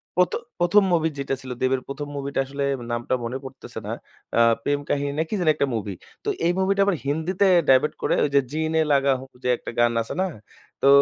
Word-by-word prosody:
প্রথ 180 -1 +3 0.3
প্রথম 175 +4 +5
মুভি 160 -1 +2
যেটা 140 0 -2
ছিল। 130 -1 -8
দেবের 130 0 +2
১ম 140 +1 -5
মুভিটা 140 0 -3
আসলে 140 +1 -4 0.3
নামটা 120 +2 -2
মনে 120 +3 -3
পড়তেছে 130 0 -9
না। - - -3 0.5
আ - - +5 0.2
প্রেম 145 0 +1
কাহিনী 140 0 0
না 160 - +2
কি - - -5
জানি 175 -3 +2
একটা 140 - +1
মুভি। 105 -3 -3 0.3
তো - - -1 0.2
এই 170 - +4
মুভিটা 195 +1 +2
আবার 200 -2 +2
হিন্দিতে 160 +7 +1 0.2
ডাইভার্ট 135 +3 +5
করে - - +1
ওইযে 140 -1 +3
জি 155 - -2
নে 160 - +3
লাগাহু 135 -2 +2 0.2
যে - - -1
একটা - - -7
গান 120 0 +4
আছে 115 - -5
না? - - +2 0.6
তো - - +4
140 Hz, 205 wpm, -24 LUFS, 130-160 Hz, 0.6 s, প্রথম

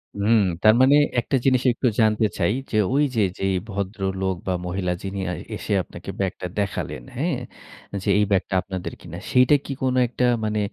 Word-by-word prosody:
হুম। 105 +3 +3 0.2
তার 110 - +7
মানে 135 +2 +6 0.2
একটা 120 - -1
জিনিস 130 -2 +4
একটু 125 - 0
জানতে 110 0 +3
চাই 90 +2 +2 0.2
যে, 110 - +1 0.2
ওই 145 +2 +3
যে 110 - +2 0.2
যেই 95 0 +1 0.2
ভদ্রলোক 95 -1 -2
বা 95 - +1
মহিলা 90 0 -2
যিনি 100 0 -4 0.4
এসে - - -3
আপনাকে - - -11
ব্যাগটা 95 -2 -2
দেখালেন, 100 -10 -3
হ্যাঁ? 145 +2 -1 0.7
যে - - -1
এই - - +4
ব্যাগটা 95 0 +1
আপনাদের 95 -1 -6
কিনা 85 -1 -9
সেইটা 125 +3 +5
কি - - -5
কোন 130 -1 +1
একটা 125 +1 -3 0.2
মানে 105 0 0
100 Hz, 175 wpm, -23 LUFS, 95-125 Hz, 0.7 s, তার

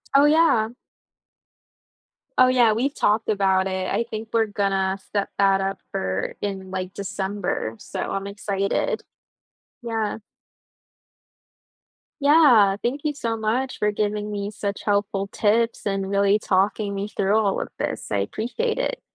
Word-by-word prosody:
Oh, 280 +1 +7
yeah. 295 -8 +4 1.7
Oh, 255 - +8
yeah, 240 -4 +4
we've 270 +6 0
talked 215 +2 +1
about 190 -2 +2
it, 185 -1 -2
I 235 - +1
think 220 0 -5
we're 225 -1 +3
gonna 195 -2 0
set 200 -1 -1
that 195 -1 +4
up 195 0 -2
for 95 0 -2
in, 190 -2 -4
like, 185 0 -4
December, 195 - -3
so - - -7
I'm 195 0 -3
excited. 200 - -1 0.8
Yeah. 225 -3 -2 2.0
Yeah. 270 -10 +6
Thank 270 +4 -1
you 300 -1 0
so 230 -5 -2
much 235 +5 -1
for 210 0 +1
giving 210 0 -2
me 200 0 -3
such 200 -1 -4
helpful 200 -1 0
tips 225 +3 +1
and 195 -1 -1
really 200 +1 +3
talking 200 +1 +1
me 200 +1 -3
through 200 +2 +1
all 205 -3 +1
of - - -4
this, - - -3
I 100 - +1
appreciate 345 - -2
it. - - -1
205 Hz, 140 wpm, -23 LUFS, 195-230 Hz, 2.0 s, Oh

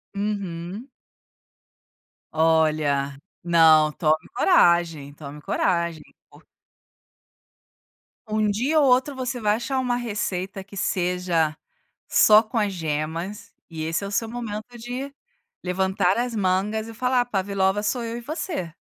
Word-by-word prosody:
Uhum. 200 +1 -4 1.5
Olha, 155 -3 +2 0.3
não, 160 -3 +5
tome 155 0 0
coragem, 165 -5 +3
tome 145 0 -10
coragem. 170 -5 0 2.3
Um 215 0 +1
dia 255 +10 +1
ou 290 - +4
outro 260 +3 +3
você 250 -1 -3
vai 210 0 +2
achar 260 +3 -2
uma 250 -2 0
receita 195 -4 -3
que 200 +1 -13
seja 180 -4 0 0.5
só 215 0 +6
com 225 +2 -6
as 210 -2 +1
gemas, 165 +4 -4 0.2
e 160 -2 -5
esse 165 +4 -1
é - - -3
o - - -7
seu 225 +2 -1
momento 230 0 -6
de 250 +4 -6 0.5
levantar 190 +1 +1
as 245 0 -1
mangas 205 +3 0
e 225 - -9
falar: 250 +1 +1
"Pavlova 195 -2 0
sou 215 +4 -1
eu 230 0 -4
e - - -7
você". 290 - -4
195 Hz, 125 wpm, -24 LUFS, 165-230 Hz, 2.3 s, só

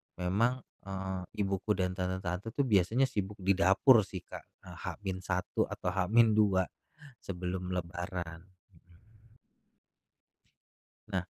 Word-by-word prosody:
memang, 115 +8 +1 0.2
eee, 95 -1 -3 0.2
ibuku 100 +2 0
dan 90 -1 0
tante-tante 95 +3 -3
tuh, 140 - +2
biasanya 110 +1 +3
sibuk 100 -3 -3
di 95 - +4
dapur, 100 +6 +6
sih, 95 -2 -7
Kak, - - -10 0.2
eee, - - -11
H-1 95 -2 -2
atau 90 - -3
H-2 105 0 +4 0.6
sebelum 90 0 -4
Lebaran. 85 -1 -4 0.3
Mhm. 105 +7 -25 1.7
Nah 95 -3 -1
95 Hz, 105 wpm, -32 LUFS, 90-105 Hz, 1.7 s, dapur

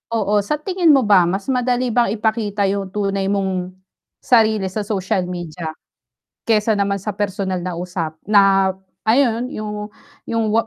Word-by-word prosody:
oo. 210 -1 +2
Sa 300 - -1
tingin 360 0 +1
mo 270 -5 +4
ba, 200 -4 +6
mas 195 +2 -2
madali 250 -1 0
bang 240 -5 +3
ipakita 215 -2 0
yung 195 -1 -2
tunay 195 -1 -1
mong 190 -2 -1 0.5
sarili 220 -5 +3
sa 205 +3 -3
social 190 -2 -1
media, 170 -2 -5 0.7
kesa 220 -1 +2
naman 200 0 0
sa 210 -1 -4
personal 190 -3 -2
na 180 -1 -3
usap 170 -2 -4
na 195 -2 +5 0.4
ayun 240 0 +2
yung 210 0 -5 0.4
yung 225 -2 0
205 Hz, 145 wpm, -20 LUFS, 190-220 Hz, 0.7 s, ba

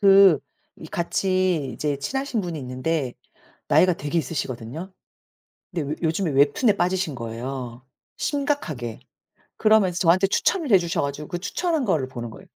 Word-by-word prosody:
그 195 -5 +7 0.4
이 - - -10
같이 180 -3 0
이제 145 -2 -1
친하신 265 - -2
분이 175 -4 -4
있는데 130 +1 -2 0.6
나이가 180 0 +5
되게 145 +1 -4
있으시거든요. 135 - -4 0.8
근데 150 -5 -2
요 - - -1
요즘에 165 +1 +1
웹툰에 150 - +3
빠지신 180 -4 0
거예요 120 +1 -6 0.3
심각하게. 275 - -2 0.6
그러면서 215 -5 +4
저한테 185 +3 +4
추천을 315 - +1
해 195 - +8
주셔 170 -2 -1
가지고 140 +1 -3
그 175 - -4
추천한 320 - -1
거를 160 - +1
보는 120 -3 -6
거예요. - - -13
165 Hz, 340 characters per minute, -24 LUFS, 135-195 Hz, 0.8 s, 해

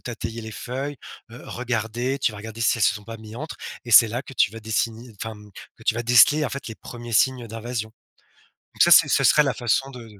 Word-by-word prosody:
tater 120 -2 -6
les 110 -1 -8
feuilles, 135 +6 -5 0.3
heu, 120 - -11
regarder, 120 +2 -3
tu 125 - 0
vas 105 - -9
regarder 110 +2 -9
si 115 - +2
elles 105 - +3
se - - +3
sont 105 -2 -9
pas 115 +1 -8
mis 110 0 -11
entre. 150 +4 -7 0.3
Et 120 - -8
c'est 115 +1 +8
là 120 +4 -4
que - - -12
tu 105 -6 +2
vas 115 +1 -10
dessiner, 115 +2 -3
enfin, 110 - -5
hem, 105 -1 -14 0.3
que - - -17
tu - - +1
vas 120 - -3
déceler, 125 +6 +5
en - - -1
fait, 140 - -6
les 110 - -7
1ers 120 +1 -10
signes 125 +1 +2
d'invasion. 115 0 -5 0.8
Donc - - +2
ça - - +5
c'est - - +8
ça - - +2
serait 150 - +6
la 135 -4 -1
façon 120 +3 0
de 125 -3 -11
115 Hz, 245 wpm, -23 LUFS, 110-125 Hz, 0.8 s, c'est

